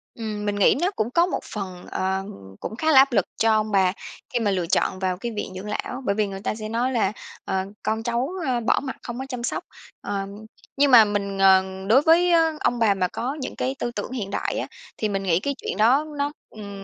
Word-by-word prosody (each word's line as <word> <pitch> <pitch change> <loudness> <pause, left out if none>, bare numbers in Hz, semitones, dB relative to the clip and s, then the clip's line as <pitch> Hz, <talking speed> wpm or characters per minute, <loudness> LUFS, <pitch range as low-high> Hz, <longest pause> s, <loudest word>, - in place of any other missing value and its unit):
Ừm, 215 -2 -4
mình 205 0 0
nghĩ 205 - +4
nó 365 +3 +2
cũng 220 +2 -1
có 340 +5 +4
một 360 - -2
phần, 185 -4 -6
ờ, 190 +1 -1 0.4
cũng - - -5
khá 315 +6 +1
là 285 - +6
áp 270 +1 +7
lực 200 -6 +2
cho 225 0 +3
ông 215 0 +1
bà 190 -2 +3 0.4
khi 240 - +2
mà 210 -3 +1
lựa 185 -3 0
chọn 185 +1 +1
vào 185 -1 -1
cái 235 +5 -4
viện 205 - -4
dưỡng 185 +2 -7
lão, 250 +4 -4
bởi 200 - +1
vì 210 -1 +1
người 195 0 -7
ta - - -1
sẽ 215 -1 -6
nói 240 +3 0
là, 225 -6 +1 0.3
ờ, 190 0 -1 0.2
con 220 +1 -1
cháu, 240 +3 -1 0.2
ơ, 250 -2 +1
bỏ 225 - +2
mặc 265 -2 -5
không 240 0 -6
có 265 - -4
chăm 250 -3 -5
sóc. - - -2 0.4
Ờ, 195 -1 -3 0.5
nhưng 285 0 +4
mà 230 -3 +9
mình, 200 -1 -2
ờ, 190 -1 +6 0.2
đối 240 +6 +6
với 335 +3 +4 0.3
ông 240 - 0
bà 220 -3 +4
mà 185 -2 0
có 250 +9 -4
những 265 - -5
cái 265 +1 -2
tư 240 - -2
tưởng 210 +1 -5
hiện 225 -7 -4
đại - - -2
á, - - -2 0.3
thì 215 - -1
mình 195 -1 -2
nghĩ 175 -3 +2
cái 280 +8 -2
chuyện - - -5
đó 255 +8 +4
nó 285 0 0 0.2
ừm, 200 -2 -9
215 Hz, 245 wpm, -24 LUFS, 195-250 Hz, 0.5 s, mà